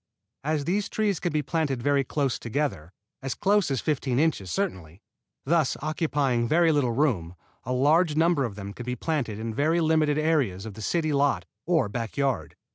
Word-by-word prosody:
As 150 -1 -1
these 200 +4 0
trees 210 -4 0
can 175 - -1
be 150 -1 0
planted 140 -4 -1
very 140 0 +3
close 135 -1 -1
together 115 - -3 0.3
as 135 -1 -3
close 205 -3 +2
as 135 -3 -1
fifteen 135 -4 -1
inches 145 - +1
certainly 95 - -3 0.4
thus 160 -1 +2
occupying 145 -6 0
very 165 +4 +4
little 140 -5 +2
room, 110 - 0 0.3
a 125 - -3
large 150 +5 +3
number 165 -2 +3
of 115 -6 -3
them 100 0 -7
can 125 +3 -9
be 125 - -1
planted 125 -6 -2
in 110 +1 -4
very 155 +7 +2
limited 155 -2 +2
areas 140 - +1
of 110 - -7
the 110 - -10
city 155 +6 0
lot 140 0 +1 0.2
or 165 -9 +3
backyard. 125 +4 -2
145 Hz, 180 wpm, -26 LUFS, 120-160 Hz, 0.4 s, very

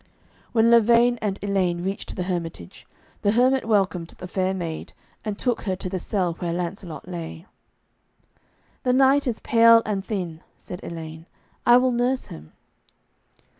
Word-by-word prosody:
When 230 0 +4
Lavaine 235 +1 +5
and 200 -2 -1
Elaine 185 -4 0
reached 195 +2 -4
the 180 - -2
hermitage, 170 - -5 0.3
the 205 - +2
hermit 255 +2 +3
welcomed 190 -6 +1
the 180 - -7
fair 185 0 0
maid, 170 -4 -5 0.3
and 210 -2 -3
took 245 0 -1
her 190 -3 -2
to 185 - -5
the 185 - -3
cell 180 -2 -1
where 175 -1 -2
Lancelot 175 -1 -5
lay. 170 -1 -7 1.4
'The 250 -2 +1
knight 270 +2 +4
is 235 -3 -1
pale 230 0 +6
and 200 -3 -2
thin,' 180 -6 -4 0.2
said 180 - -8
Elaine; 160 0 -8 0.4
'I 240 0 +8
will 255 0 +3
nurse 245 +2 0
him.' 80 0 -11
195 Hz, 150 wpm, -24 LUFS, 175-235 Hz, 1.4 s, I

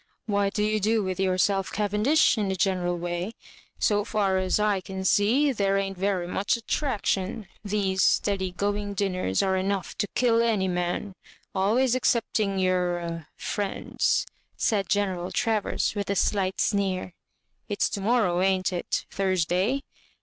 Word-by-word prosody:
What 200 -2 0
do 210 - +1
you 215 0 +1
do 215 +1 +1
with 185 -1 -3
yourselfj 190 +1 +1
Cavendish, 210 +9 +3
in 210 -4 -1
a 190 - 0
general 180 -2 0
way? 175 +4 -3 0.4
So 205 -1 +2
far 195 -3 +1
as 185 +2 +1
I 210 -2 +1
can 190 +1 -6
see, 235 +10 +3
there 195 -5 +1
ain't 195 0 -2
very 190 -1 -1
much 195 +6 0
attraction. 220 -5 -2 0.2
These 195 -2 0
steady 195 -2 +2
going 205 +2 -2
dinners 185 - 0
are 190 -1 +1
enough 190 0 -2
to 205 - +1
kill 230 -2 +3
any 215 -5 +1
man; 180 +2 -2 0.4
always 230 +7 +2
ex 255 - +3
cepting 210 -4 -1
your 175 -3 -1
— - - -49
friend's," 205 -2 -1 0.3
said 200 -4 0
General 190 -3 0
Travers, 225 -4 0
with 205 -2 -3
a - - +2 0.2
alight 190 -1 -1
sneer. 190 -3 0 0.3
" - - -47
It's 205 - +1
to 200 - -4
morrow, 205 -5 +2
ain't 190 -1 +1
it 175 - -2
?— - - -37
Thursday?" 190 - 0
195 Hz, 155 wpm, -26 LUFS, 185-210 Hz, 0.4 s, Cavendish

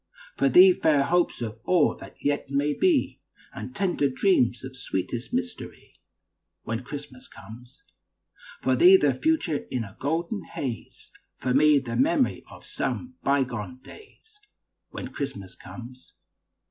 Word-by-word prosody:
For - - +2
thee, 370 +1 +8
fair 150 - +2
hopes 175 -4 +1
of 110 0 -6
all 175 +2 +3
that - - -12
yet 145 -1 -1
may 140 +2 +1
be, 345 - +1 0.3
And - - -8
tender 180 -8 +1
dreams 130 - +2
of 130 0 -8
sweetest 120 0 -4
mystery, 245 -2 -5 0.7
When 115 +3 -4
Christmas 140 -2 -9
comes. 120 +6 -14 0.8
For - - +2
thee, 365 +3 +8
the 370 - +2
future 310 - 0
in 125 -3 -2
a 100 -3 -11
golden 170 +8 -2
haze, 120 -6 -7 0.3
For 125 0 -1
me, 150 +2 +5
the 130 -4 -3
memory 290 -2 +1
of - - -14
some 255 0 -4
bygone 130 -4 -1
days, 430 - -17 0.5
When - - -7
Christmas 120 -10 -6
comes. 125 +1 -12
140 Hz, 135 wpm, -26 LUFS, 125-205 Hz, 0.8 s, thee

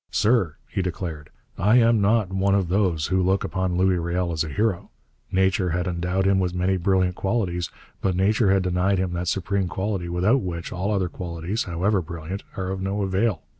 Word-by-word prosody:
'Sir,' 105 -8 +2
he - - -2
declared, 85 -4 -5 0.3
'I 105 +5 +4
am 115 -3 +5
not 105 -2 +2
one 100 +1 +2
of 95 -4 +1
those 90 -5 +1
who 95 - +3
look 95 +2 +1
upon 95 -2 -1
Louis 95 -1 +3
Riel 85 +1 -1
as 80 -1 0
a 80 - -5
hero. 100 +3 -1 0.4
Nature 95 0 +2
had 90 +2 -1
endowed 90 +1 -1
him 95 0 +3
with 90 -1 -1
many 90 +1 +1
brilliant 95 0 +2
qualities, 95 -5 -1 0.3
but 95 -2 0
nature 100 +3 +2
had 95 -1 +3
denied 90 +2 +1
him 90 -1 -1
that 90 0 -3
supreme 95 +1 0
quality 95 -1 -3
without 95 +10 +2
which 85 -3 -5
all 95 +4 -2
other 95 -3 +1
qualities, 85 +4 -4
however 95 +3 +1
brilliant, 85 +3 -6 0.2
are 95 -1 -2
of 95 0 -4
no 100 +1 -1
avail. 95 -1 0
95 Hz, 195 wpm, -24 LUFS, 90-100 Hz, 0.4 s, am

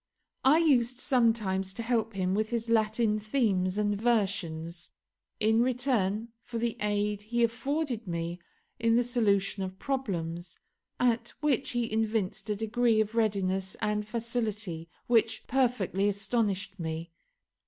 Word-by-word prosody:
I 275 +4 +6
used 255 -7 +3
sometimes 220 -8 +1
to 230 - -4
help 225 -2 0
him 185 -1 0
with 215 +2 0
his 235 -1 -2
Latin 220 -1 +2
themes 205 -5 +1
and 205 -1 0
versions 175 -7 0 0.5
in 220 +1 +4
return 235 -4 0
for 235 - -6
the 230 0 -1
aid 210 0 0
he 235 +3 0
afforded 250 0 -1
me 170 0 -3 0.4
in 230 0 +3
the 245 - +4
solution 210 -5 +1
of 190 0 -4
problems, 175 - -3 0.4
at 240 -1 +2
which 275 -3 +1
he 240 -1 0
evinced 215 -2 -1
a 210 - +1
degree 225 +1 +2
of 215 0 0
readiness 195 -4 0
and 210 0 -1
facility 215 -7 -3 0.2
which 225 -2 +2
perfectly 235 -7 +1
astonished 200 -1 -1
me. 165 0 -4
215 Hz, 130 wpm, -29 LUFS, 195-235 Hz, 0.5 s, I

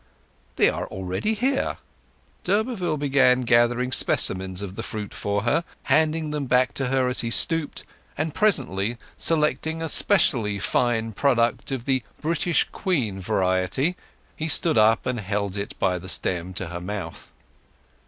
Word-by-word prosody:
"They - - +4
are - - -2
already 95 - -3
here." 260 +5 -1 0.7
D'Urberville 195 -5 0
began 135 -3 +3
gathering 120 +1 +2
specimens 95 -5 +1
of 95 -2 -6
the 115 - -6
fruit 105 -2 -6
for 100 0 -2
her, 145 +8 +1 0.2
handing 155 0 +1
them 145 -2 -3
back 125 +1 +2
to 135 - -2
her 130 0 +1
as 125 - 0
he 115 - -2
stooped; 165 +5 +2 0.3
and, 155 0 -2
presently, 120 - 0 0.2
selecting 160 0 +1
a 165 - -2
specially 120 - +3
fine 115 +2 0
product 120 +2 0
of 130 -3 -4
the 130 -2 +1 0.2
"British 165 0 0
Queen" 125 - -1
variety, 95 - 0 0.4
he 155 - -4
stood 165 +1 +3
up 110 0 +3
and 125 -2 -2
held 100 -1 -3
it 100 0 -5
by 90 -1 0
the 95 +2 -9
stem 90 -1 -2
to 95 -2 -4
her 85 0 -6
mouth. 90 -3 -7
125 Hz, 150 wpm, -24 LUFS, 100-155 Hz, 0.7 s, They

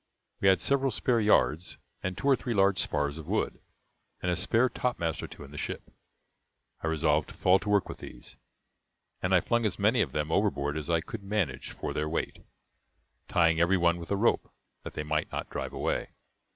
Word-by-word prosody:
We 95 - +2
had 95 -1 +6
several 135 -1 +2
spare 125 -1 +1
yards, 90 -6 +2 0.2
and 95 0 -3
two 100 - -6
or 140 -1 +6
three 120 -2 -3
large 100 -2 +4
spars 75 +1 0
of 80 - -9
wood, - - -1 0.6
and 90 - -1
a - - +1
spare 115 +7 +3
topmast 105 - -2
or - - -5
two - - -11
in 70 - -12
the 75 - -7
ship; - - -5 0.9
I - - -2
resolved 75 -2 +1
to - - -11
fall 95 +1 +4
to 105 - -5
work 105 -1 +3
with - - -8
these, - - -11 0.9
and 90 - -1
I 95 -2 +5
flung 120 0 +1
as 105 -4 -1
many 110 +5 +3
of 70 - 0
them 75 +2 -2
overboard 75 -8 +1
as 80 +1 -4
I 85 -1 +2
could 110 +5 -7
manage 100 -8 -2
for - - -4
their 75 +1 -1
weight, 80 - -3 0.8
tying 80 -2 +3
every 85 +3 +4
one 85 -1 +2
with 85 - -8
a 100 - +1
rope, 115 +4 +1 0.3
that - - -9
they 75 - -2
might 75 0 -1
not - - -4
drive - - -4
away. - - -2
90 Hz, 205 wpm, -29 LUFS, 80-105 Hz, 0.9 s, had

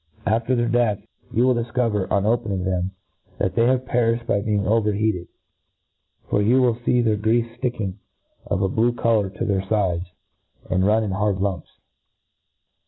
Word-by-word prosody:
After 115 +4 +1
their 120 -1 +1
death, 115 -4 +1 0.3
you 120 - +2
will 130 - +4
difcover, 115 -4 -1
on 100 -1 +1
opehing 105 -4 0
them^ 90 0 -1 0.5
thlt 95 -2 0
they 120 +3 +3
perifhed 120 -2 0
by 100 -4 +1
being 105 -1 0
over 105 +1 +2
heated 100 -4 -1
j - - -43 1.0
for 100 - +1
you 120 +6 +4
will 125 -2 +3
fee 120 +1 +1
their 110 -3 +1
greafe 115 +2 0
fl:icking, 115 -7 -2 0.5
of 95 - 0
a - - +3
blue 115 +5 +1
colour, 115 -4 +1
to 95 - -4
their 95 -2 +1
fides, 95 -3 -1 0.6
and 95 +1 +2
run 110 +1 +3
in 105 - -2
hard 100 0 0
lumps. 95 -3 -2
110 Hz, 170 wpm, -22 LUFS, 100-120 Hz, 1.0 s, will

